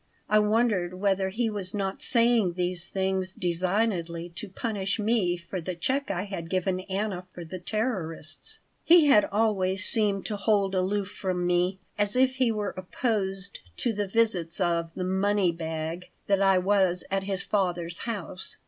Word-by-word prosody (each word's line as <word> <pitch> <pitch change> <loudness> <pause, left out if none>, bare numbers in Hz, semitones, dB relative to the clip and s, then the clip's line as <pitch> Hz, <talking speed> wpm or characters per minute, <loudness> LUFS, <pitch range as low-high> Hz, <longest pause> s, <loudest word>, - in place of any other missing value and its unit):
I 215 - +4
wondered 210 -4 +1
whether 190 0 +1
he 225 +4 -1
was 205 -3 -4
not 195 -1 -3
saying 230 -6 +4
these 180 0 -2
things 190 -1 -1
designedly 175 -1 -1
to 185 +4 -7
punish 200 -1 -2
me 210 -5 +1
for 175 +2 -6
the 180 +2 -4
check 270 +10 -1
I 185 -2 -1
had 190 -5 -6
given 185 0 0
Anna 190 -2 -3
for 175 - -7
the 185 +3 -7
terrorists. 185 - -3 0.3
He 340 -2 +7
had 240 -8 +6
always 195 -3 +2
seemed 205 -3 +2
to 210 - -3
hold 200 -1 +1
aloof 195 +1 -1
from 180 -2 -2
me, 180 +2 +1 0.2
as 205 +1 +2
if 260 0 +3
he 255 -3 +3
were 210 -2 -3
opposed 195 0 -3 0.2
to 235 - 0
the 205 -1 -2
visits 190 -6 +2
of 170 -2 0
the 185 - -3
"money 190 0 +1
bag" 165 +1 -5 0.2
that 200 -1 +2
I 195 -1 +5
was 185 -1 +3
at 195 0 -1
his 195 -1 0
father's 175 -4 -1
house. 200 -5 -3
190 Hz, 165 wpm, -27 LUFS, 180-210 Hz, 0.3 s, He